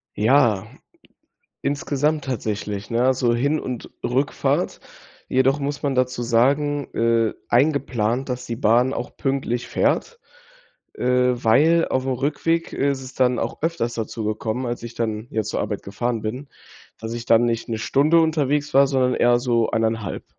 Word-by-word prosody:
Ja, 110 -4 +3 1.0
insgesamt 145 +1 0
tatsächlich, 105 -5 -4
ne, 120 +1 +1
also 125 -2 +2
Hin 140 +6 +1
und 125 -2 -6
Rückfahrt. 130 +3 0 0.5
Jedoch 130 +2 +2
muss 140 0 -3
man 140 -2 0
dazu 125 -1 0
sagen, 140 +4 +1
äh, 115 -1 +2
eingeplant, 130 -2 +1
dass 125 -1 -4
die 115 - -4
Bahn 120 +2 +3
auch 120 - -5
pünktlich 135 -3 -2
fährt, 475 0 0 0.7
äh, - - -5
weil 125 +6 +3
auf'm 130 0 0
Rückweg 165 +4 -1
ist 140 -1 -1
es 130 0 -10
dann 125 -2 +2
auch 115 - -4
öfters 160 -8 -1
dazu 115 0 -4
gekommen, 110 +4 -2
als 120 -1 -4
ich 120 - -8
dann 110 -1 -3
jetzt 110 -1 -2
zur - - -2
Arbeit 105 -1 -3
gefahren 110 +3 -3
bin, 125 +6 -5 0.5
dass 110 0 -5
ich 120 0 -6
dann 115 +1 +5
nicht 115 -1 -1
'ne 115 -1 -2
Stunde 145 +8 +3
unterwegs 150 -2 0
war, 140 +1 +6
sondern 130 -2 +1
eher 120 0 +3
so 120 -3 +1
1,5. 110 -1 -1
125 Hz, 155 wpm, -22 LUFS, 115-140 Hz, 1.0 s, war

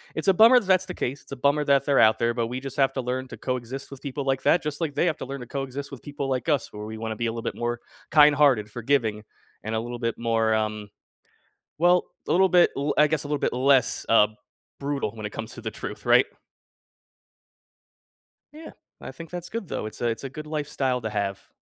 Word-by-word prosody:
it's 160 +3 0
a 195 - +6
bummer 235 +5 +7
that - - -10
that's 185 -1 +3
the 180 - -6
case, 135 +4 -3
it's - - -10
a - - -6
bummer 145 +3 +2
that 140 -1 +3
they're 140 -1 +3
out 110 0 +5
there, 120 0 +1
but 115 -1 -1
we 125 +2 -5
just 135 -2 -7
have 135 -1 +3
to 130 - -2
learn 130 +1 -3
to - - -10
coexist 130 +2 -4
with 140 - -10
people 140 0 -4
like 135 -1 0
that, 175 - +3
just 150 -1 -4
like 155 -4 -2
they 175 - +2
have 155 - 0
to - - -6
learn 135 0 -6
to 125 - -7
coexist 140 +1 -5
with 135 - -9
people 145 -1 -5
like 130 0 -2
us, 145 -6 0
where 105 0 -7
we 110 0 -7
wanna 110 -1 -4
be 115 - -2
a 115 - 0
little 115 0 -6
bit - - -2
more 120 0 -3 0.3
kind-hearted, 145 -8 +5
forgiving, 115 -3 0 0.4
and 110 +1 -2
a - - +1
little 120 +1 -5
bit 115 -1 -2
more, 115 -1 +1
um, 105 -1 -2 0.9
well, 175 +1 +4 0.2
a - - -1
little 190 +2 +5
bit 180 -1 +5
l 140 +2 0
I 150 0 +5
guess 155 -1 -1
a - - -7
little 145 0 -1
bit - - 0
less, 130 0 +2
uh, 110 -2 +6 0.5
brutal 140 -6 -2
when 110 -1 -6
it 105 - -5
comes 110 0 -7
to - - -9
the - - -4
truth, - - -8
right? - - +6 2.3
Yeah. 315 +2 -11 0.3
I - - -7
think 165 -1 -11
that's 175 -1 -6
good, 230 -3 -5
though, - - -3
it's 110 - -9
a 120 - 0
it's 115 - -3
a - - -3
good 150 +3 -8
lifestyle 145 -4 -1
to 110 -2 -4
have. 100 -2 -4
135 Hz, 245 wpm, -25 LUFS, 115-150 Hz, 2.3 s, bummer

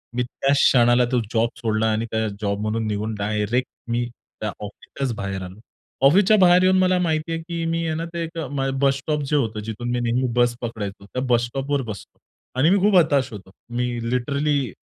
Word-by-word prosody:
मी 125 - +1
त्याच 135 +3 0
क्षणाला 120 -1 +5
तो 125 - +3
जॉब 115 0 +2
सोडला 110 -1 0
आणि 110 +1 -1
त्या 110 0 0
जॉब 100 -1 -1
म्हणून 110 +1 -1
निघून 105 +1 -2
डायरेक्ट 105 +4 -1 0.2
मी 120 +1 0
त्या 110 -2 -8
ऑफिसच्याच 115 +5 -5
बाहेर 100 -1 -4
आलो. 95 +3 -10 0.5
ऑफिसच्या 200 +7 +5
बाहेर 180 -1 +6
येऊन 185 0 +4
मला 185 0 +3
माहिती 160 -2 -1
आहे, 165 - -2
की 170 0 -4
मी 165 0 -1
आहे 155 - -1
ना 165 - -3
ते 170 -1 -2
एक 165 +1 -7 0.4
बस 135 -1 +3
स्टॉप 150 +2 -2
जे 150 - +1
होतं. 110 -6 0
जिथून 110 +3 -5
मी 125 - 0
नेहमी 120 +2 0
बस 120 -1 +3
पकडायचो, 105 -4 -5
त्या 125 +6 -4
बस 120 -1 +3
स्टॉपवर 135 +3 -2
बसलो. 110 -4 -9 0.4
आणि 155 - +5
मी 195 - +4
खूप 200 0 +3
हताश 145 -7 +3
होतो. 95 -2 -10 0.2
मी 120 +1 -1 0.3
लिटरली 140 0 0
125 Hz, 200 wpm, -23 LUFS, 110-155 Hz, 0.5 s, बाहेर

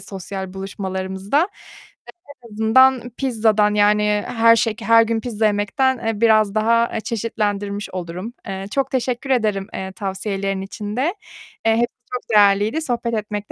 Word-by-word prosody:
sosyal 190 -1 -7
buluşmalarımızda. 190 - -2 1.0
En 235 - -13
azından 245 +3 +4
pizzadan 220 -5 +2
yani 210 0 +3
her 230 -1 +5
şek 225 -1 -1
her 230 0 +5
gün 225 0 -1
pizza 225 -2 -2
yemekten, 210 +6 +1
eee, 225 -1 -2
biraz 215 -2 +4
daha, 230 +2 +2
eee, 225 - -1
çeşitlendirmiş 205 -3 -3
olurum. 180 +5 -6
Eee, 195 0 -5
çok 270 -1 -1
teşekkür 255 0 -2
ederim, 215 -6 +1
eee, 190 0 -5
tavsiyelerin 195 0 -3
için 205 +2 -6
de. 255 - +1 0.6
Eee, 225 - +4
hepsi 240 +1 0 0.2
çok 250 - -5
değerliydi, 205 +8 +4
sohbet 235 -4 -2
etmek 210 -1 -4
210 Hz, 140 wpm, -20 LUFS, 200-230 Hz, 1.0 s, her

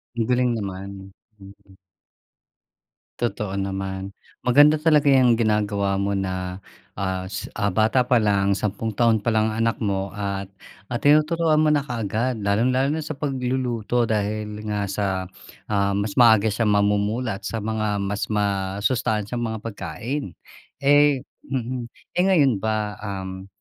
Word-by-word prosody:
Ang 115 -1 -1
galing 125 0 +2
naman. 95 -1 -6 0.3
Mm. 95 0 -16 1.4
Totoo 105 -5 -2
naman. 95 0 -3 0.3
Maganda 145 +5 +6
talaga 150 -2 +3
yang 125 -4 +5
ginagawa 105 -3 +1
mo 100 +1 -1
na, 95 -1 -3 0.4
ah, 95 -1 -2
s 100 +2 -6
ah, 100 -1 0
bata 110 +6 +3
palang 105 -5 +2
sampung 105 +3 -2
taon 110 -1 +2
palang 110 -2 +2
ang 115 - 0
anak 115 0 +1
mo 100 -3 -1
at, 100 -1 -4 0.4
ah, 120 - -1
tinuturuan 155 +1 +3
mo 155 - +4
na 150 - +3
kaagad 115 -3 -2
lalong-lalo 125 +7 +2
na 160 - -1
sa 155 -1 -5
pagluluto 125 -4 -1
dahil 105 -1 -2
nga 105 -1 -1
sa, 95 -2 -2 0.4
ah, 100 -1 +1
mas 100 +2 -1
maaga 110 -3 +6
siyang 110 0 +1
mamumulat 105 +2 0
sa 115 -2 -4
mga 105 -2 -1
mas 100 +1 -2
masustansyang 105 +3 -1
mga 110 -1 -5
pagkain. 115 - -5 0.5
Eh, 145 -1 +4 0.2
mm, 125 -2 -3 0.3
eh 180 - +5
ngayon 140 - +3
ba, 105 -2 -2
um, 95 -2 -6
110 Hz, 135 wpm, -23 LUFS, 100-125 Hz, 1.4 s, Maganda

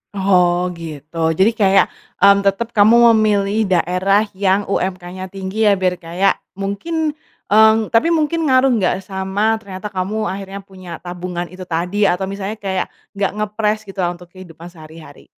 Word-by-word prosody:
Oh, 180 -2 +2
gitu 155 -2 -10 0.2
jadi 200 +4 +5
kayak, 195 -3 +4 0.3
mmm, 200 0 +5
tetap 200 +4 0
kamu 230 +2 +6
memilih 210 0 +1
daerah 185 +4 +2
yang 195 +1 +1
UMK-nya 185 -1 -4
tinggi 195 +3 -3
ya 210 - +5
biar 185 -1 +1
kayak 180 +3 0 0.2
mungkin, 295 - -3 0.3
eee, 220 +1 +5
tapi 240 +9 +2
mungkin 325 +1 +1
ngaruh 260 -3 +3
nggak 190 -5 +1
sama 195 +3 0
ternyata 200 -2 -7
kamu 205 +2 -3
akhirnya 195 +1 -6
punya 185 -2 -12
tabungan 175 0 -5
itu 185 +2 -10
tadi 180 +4 -2
atau 190 0 +1
misalnya 200 +2 -5
kayak 190 -2 -3 0.2
nggak 195 -1 0
ngepress 215 0 -1
gitu 195 0 -10
untuk 175 0 -4
kehidupan 175 -2 -13
sehari-hari? 160 -2 -14
195 Hz, 150 wpm, -18 LUFS, 180-215 Hz, 0.3 s, kamu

